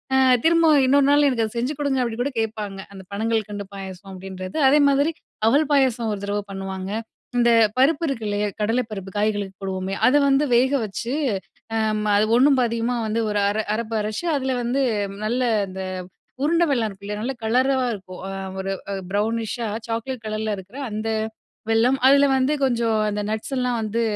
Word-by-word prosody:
ஆ - - +5 0.3
"திரும்பவும் 325 -4 +5
இன்னொரு 275 +1 +4
நாள் 290 0 +5
எனக்கு 230 -4 +1
அத 215 - -7
செஞ்சு 250 +5 -1
குடுங்க" 275 -3 +1
அப்டின்னு 235 0 -3
கூட 280 - -2
கேட்பாங்க. 210 -3 -3
அந்த 190 -1 -10
பணங்கல்கண்டு 215 -1 -2
பாயாசம் 195 0 -8
அப்டின்றது. 185 +1 -7
அதே 295 +2 +5
மாதிரி 285 +3 +2 0.4
அவல் 280 +5 +3
பாயாசம் 250 -5 +2
1 200 - -6
தடவ 205 +1 -1
பண்ணுவாங்க. 190 -1 -5 0.5
இந்த 240 0 +4 0.3
பருப்பு 295 +4 +3
இருக்குல்லையா 210 -5 -1
கடல 225 +4 +2
பருப்பு 195 -2 -6
காய்களுக்கு 205 -2 -1
போடுவோமே, 190 0 -3
அதை 285 +3 +5
வந்து 275 +2 +3
வேக 255 +3 +4
வச்சு 230 +5 -4 1.0
அது 210 - +3
ஒண்ணும் 270 +1 +5
பாதியுமா 235 +1 0
வந்து 220 +2 -1
ஒரு 210 - 0
அர 210 +2 -1 0.2
அரப்பு 225 0 -3
அரைச்சு 215 +10 -3
அதில 265 -1 -1
வந்து 250 +4 0 0.4
நல்ல 245 +4 0 0.3
இந்த 190 0 -6 0.6
உருண்டை 335 +3 +3
வெல்லம் 240 -6 +1
இருக்கு 195 -1 -13
இல்லையா? 210 +1 -4
நல்ல 255 +4 -2
கலரா 255 +5 +2 0.2
இருக்கும், 185 -3 -9 0.4
ஒரு 195 0 -2 0.4
ப்ரௌனிஷ் 220 +2 -1
ஷா 235 -2 -2 0.2
சாக்லேட் 230 +1 -4
கலர்ல 215 0 -2
இருக்கிற 195 +7 -11
அந்த 215 +1 -3 0.6
வெல்லம் 230 +4 +3
அதுலல 280 +1 +6
வந்து 265 +3 +2
கொஞ்சம் 235 -4 +1
அந்த 210 0 -2
நட்ஸ் 220 +5 -3
லாம் 250 -1 0
வந்து 220 +2 -1
225 Hz, 165 wpm, -23 LUFS, 205-265 Hz, 1.0 s, அதுலல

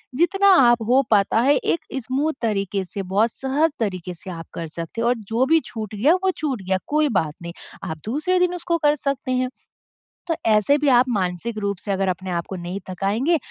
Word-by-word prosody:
जितना 390 +6 +3
आप 240 -2 +5
हो 260 +2 +5
पाता 210 +1 +3
है 280 +4 +4
एक 335 - 0 0.3
स्मूद 280 +5 -1
तरीके 200 -3 -1
से 195 +2 -6
बहुत 200 +5 +1
सहज 280 +7 0
तरीके 185 -5 -3
से 170 +3 -10
आप 165 -1 -8
कर 165 - -5
सकते 165 +7 -6
हो 235 - +1
और 245 - +3 0.2
जो 245 +3 +3
भी 325 +4 +4
छूट 215 -2 -6
गया 280 - +4
वो 380 - +3
छूट 275 -8 -2
गया 190 0 0
कोई 300 0 +2
बात 165 - 0
नहीं, 170 0 -7 0.3
आप 160 - -4
दूसरे 310 - 0
दिन 360 0 +2
उसको 340 -1 -1
कर 295 0 +5
सकते 275 -2 -3
हैं। 255 0 0 0.8
तो 330 - 0 0.2
ऐसे 215 +7 +4
भी 295 0 -1
आप 250 -1 +5
मानसिक 195 +1 -2
रूप 200 -1 -2
से 205 - -4
अगर 195 0 0
अपने 180 -1 -2
को 190 - -4
नहीं 175 +2 -5
थकाएँगे 215 - +1
230 Hz, 210 wpm, -22 LUFS, 190-285 Hz, 0.8 s, आप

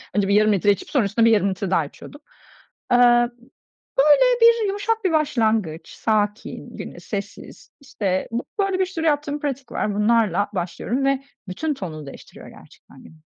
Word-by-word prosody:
Önce 200 -2 +2
bir 200 - +1
yarım 215 0 +4
litre 205 +1 +3
içip 195 - -4
sonra 255 -8 +1
üstüne 225 +3 +2
bir 230 - +5
yarım 200 -2 +3
litre 190 0 -4
daha 165 -5 +2
içiyordum. 285 - -13 0.7
Eee, 245 - +5 1.0
böyle 475 - +5
bir 465 -2 +5
yumuşak 410 +2 -2
bir 360 - +2
başlangıç, 220 - 0
sakin, 210 -1 -2
güne - - -8
sessiz, 200 -1 -8
işte, 195 -8 -2
bu 235 +2 -3
böyle 390 -1 0
bir 375 - +3
sürü 330 -3 -5
yaptığım 295 -1 0
pratik 275 -4 -5
var, 210 - -2
bunlarla 210 -3 +2
başlıyorum 200 +9 -2
ve 275 0 +1 0.2
bütün 295 +12 -2
tonunu 160 - -7
değiştiriyor 140 - -12
gerçekten - - -17
günün. 160 -1 -17
230 Hz, 165 wpm, -22 LUFS, 200-295 Hz, 1.0 s, bir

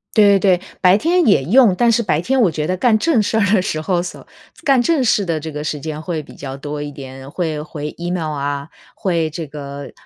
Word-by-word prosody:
对 200 -2 +6
对 185 -2 +4
对， - - -17 0.2
白 185 +1 +6
天 345 +7 +2
也 195 -10 +4
用， 215 - +5
但 235 +4 +3
是 230 - +2
白 185 -9 0
天 260 +9 +1
我 200 - +4
觉 150 -1 -3
得 180 +3 0
干 220 +3 +3
正 245 0 +2
事 220 +2 0
儿 210 - +3
的 200 - +4
时 155 -4 -2
候 175 +2 0
叟 175 - -8 0.4
干 270 -5 +4
正 300 0 +2
事 215 -3 +2
的 165 -4 -1
这 160 +1 -6
个 150 0 -5
时 150 -1 -3
间 155 +1 -5
会 160 -2 -4
比 - - -14
较 135 -1 -7
多 145 +1 -5
一 145 - -5
点。 135 -1 -10
会 155 -2 -3
回 150 -1 -6
Email 170 -2 -3
啊， 140 +1 -3 0.3
会 170 -4 0
这 165 +1 -6
个 140 -1 -8
170 Hz, 280 characters per minute, -18 LUFS, 150-205 Hz, 0.4 s, 对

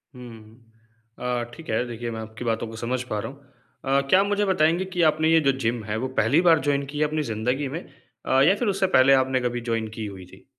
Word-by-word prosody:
हुँ। 115 -2 -13 0.6
अ, 125 -1 -2
ठीक 165 - -12
है। - - +1
देखिए, 120 0 -5
मैं 110 - -5
आपकी 110 +2 -8
बातों 115 0 -1
को 110 - -9
समझ 120 +3 -2
पा 110 -4 -4
रहा 120 - -5
हूँ 140 0 -19 0.4
अ, 135 +1 +2
क्या 185 - +6
आप 195 - +3
मुझे 205 0 +1
बताएँगे 175 -1 +2
कि 175 - 0
आपने 155 +1 0
ये 165 - +6
जो 140 -2 +3
जिम 115 -2 -1
है, 105 +1 -3
वो 130 +4 -2
पहली 140 +10 +3
बार 165 -2 +6
जॉइन 140 -1 +1
की 145 +2 -8
है - - +3
अपनी 155 +1 -2
ज़िंदगी 125 +4 -2
में? - - -3 0.5
अ, 130 0 +3
या 190 - +5
फिर 225 +3 -2
उससे 195 -1 +1
पहले 130 +1 +6
आपने 130 -1 +2
कभी 120 0 -2
जॉइन 115 -1 -1
की 110 - -5
हुई 95 -3 -8
थी? 90 - -18
130 Hz, 250 wpm, -24 LUFS, 115-155 Hz, 0.6 s, क्या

